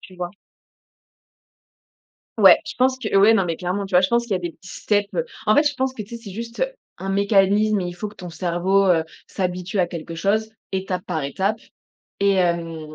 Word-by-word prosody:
Tu 185 - -14
vois? 175 -1 -4 2.1
Ouais. - - +8
Je - - -6
pense 260 +1 +3
que 215 -5 -4
ouais 210 +3 +6
non, 195 - +3
mais 165 -2 -2
clairement, 185 +3 -2
tu 190 - -8
vois? 180 - +7
Je 185 - +2
pense 235 0 +2
qu'il 235 - -4
y 190 - +3
a - - -2
des 175 -2 -5
petits 190 - -16
steps. 205 -1 +1
Heu, - - 0 0.2
en 215 - +5
fait 295 - +5
je 290 -1 +1
pense 260 0 -1
que 220 - -6
tu 205 - -15
sais, 235 - -5
c'est 200 - -9
juste 230 - -3 0.3
un 195 - -5
mécanisme 200 +1 +3
et 180 - -2
il 175 - -5
faut 205 +4 -5
que 210 - -15
ton 180 -2 -8
cerveau, 185 +3 +1
heu, 165 -3 +3 0.2
s'habitue 180 +1 -3
à 180 - +3
quelque 165 -1 -7
chose, 210 +6 0 0.2
étape 190 -1 -2
par 155 - -2
étape 195 +10 -1 0.6
et 200 0 +4
hem 165 -4 -1
195 Hz, 225 wpm, -22 LUFS, 175-215 Hz, 2.1 s, Ouais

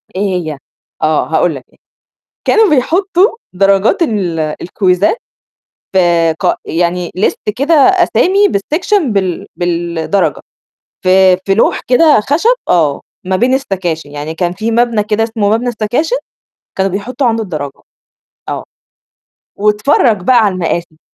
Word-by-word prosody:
إيه 195 - -2
هي؟ 180 -7 -2 0.4
آه، 155 0 +1
هاقول 160 0 +1
لك، 130 - -9 0.8
كانوا 440 -2 +4
بيحطوا 370 - +1 0.2
درجات 195 - +2
ال 195 - -1
آآ، 155 -1 -2
الكويزات 185 - +1 0.8
آآ، 170 -3 +3
قا - - +1
يعني 175 +1 -1
ليست 200 +2 -1
كده 280 +7 +1
أسامي 380 +4 +3
بالسكشن 315 - 0
بال 190 -3 -2
بالدرجة، 175 +2 -1 0.6
في 185 0 +4
في 195 - +2
لوح 220 - +2
كده 290 +3 +5
خشب 335 - +2
آه، 150 -5 +2 0.2
ما 190 +1 0
بين 245 +7 +2
السكاشن 180 - -2
يعني 150 +2 -6
كان 175 +1 -1
في 220 +4 -3
مبنى 235 -2 +1
كده 215 +1 0
اسمه 220 -2 -1
مبنى 225 +4 0
السكاشن 240 - -1 0.6
كانوا 195 0 0
بيحطوا 245 +7 -2
عنده 225 -1 0
الدرجة، 150 -8 -6 0.7
آه. - - -4 1.0
واتفرَّج 210 +1 +2
بقى 255 +6 +3
عالمآسي. 175 -4 -2
200 Hz, 130 wpm, -13 LUFS, 175-250 Hz, 1.0 s, كده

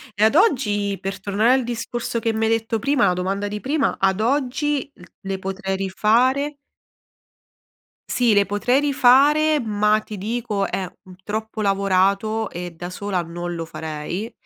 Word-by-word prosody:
E 210 - +1
ad 220 +7 +4
oggi, 205 - +2
per 195 0 -5
tornare 210 +5 +2
al 260 -1 +2
discorso 235 0 -3
che 225 0 -1
mi 220 0 0
hai 225 - +1
detto 225 0 0
prima 275 -1 +2
la 180 - +3
domanda 195 +3 -2
di 210 0 -4
prima: 285 +2 0
ad 195 +1 +2
oggi 275 +3 0
l - - -21 0.2
le 195 -1 -4
potrei 190 0 -3
rifare? 250 +9 +1 1.5
Sì, 240 -3 +2
le 200 0 +4
potrei 220 +7 +1
rifare, 290 +3 +4
ma 210 -2 +2
ti 215 -1 -9
dico 215 -1 -2
è 190 - -2 0.2
un 185 -1 -13
troppo 220 +1 -4
lavorato 200 +2 +1
e 175 0 -6
da 175 +2 -6
sola 195 -2 -2
non 175 +1 -5
lo 165 -1 -4
farei, 160 +7 -5
215 Hz, 160 wpm, -22 LUFS, 195-245 Hz, 1.5 s, ad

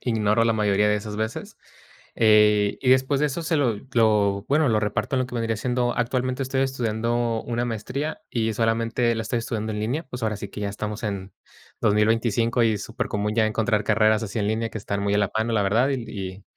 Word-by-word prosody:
ignoro 110 -1 +2
la 115 - +3
mayoría 105 -1 +2
de 105 - +2
esas 105 0 -6
veces. 110 +2 -4 0.6
Eh, 105 -2 +4
y 130 - +3
después 130 +2 +3
de 150 - +3
eso 150 +4 -3
se 160 0 0
lo 125 -6 +2 0.2
lo, 105 -3 +3
bueno, 150 +1 +3
lo 110 -2 +2
reparto 105 +5 -1
en 130 - +2
lo 130 - 0
que 125 - -10
vendría 115 -2 -1
siendo, 120 +1 -1
actualmente 125 +2 -1
estoy 130 0 -1
estudiando 120 -2 -1
una 120 0 -1
maestría 125 +7 -4
y 115 -2 0
solamente 115 +1 +1
la 110 - -2
estoy 115 +2 -2
estudiando 110 -1 -3
en 105 - -3
línea. 125 +9 -1
Pues, 125 -2 -7
ahora 110 -1 0
sí 100 - -7
que 100 - -8
ya 100 - -1
estamos 105 +2 -5
en 100 -2 -4 0.5
2025 115 +2 +2
y 115 -1 +3
es 100 - -5
súper 115 - -4
común 105 +1 -2
ya 110 -2 +3
encontrar 110 -1 0
carreras 110 0 +3
así 110 +1 -4
en 105 -1 0
línea 115 +1 -1
que - - -5
están 100 -1 -3
muy 100 0 +1
a - - +3
la 105 -2 +1
mano, 110 +1 0
la 110 -2 +2
verdad, 115 +7 +2
y 105 -7 -5
110 Hz, 220 wpm, -24 LUFS, 105-120 Hz, 0.6 s, Eh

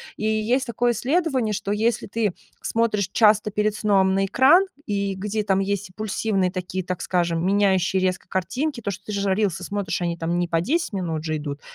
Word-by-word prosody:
И 215 - -4
есть 220 +5 +1
такое 240 +1 +1
исследование, 265 - 0
что 200 0 -3
если 225 +3 0
ты 210 -2 -1 0.3
смотришь 215 -4 0
часто 210 -1 +4
перед 210 +1 0
сном 195 -3 +3
на 195 0 +2
экран, 275 - +5 0.2
и 200 -1 -1
где 210 +2 -2
там 195 -1 +1
есть 200 0 -2
импульсивные 195 -1 -1
такие, 185 +1 -4
так 180 0 -4
скажем, 170 -2 0
меняющие 190 -1 +2
резко 185 0 -1
картинки, 250 - -2
то, 205 - -3
что 195 0 -6
ты 210 - -6
же 200 -1 0
рилсы 195 -4 -1
смотришь, 200 -1 -3
они 170 -1 -1
там 170 +1 -1
не 175 - 0
по 165 -1 +1
10 320 - -1
минут 165 -5 -2
же 155 -1 -1
идут. 145 -1 -5
200 Hz, 195 wpm, -23 LUFS, 185-220 Hz, 0.3 s, экран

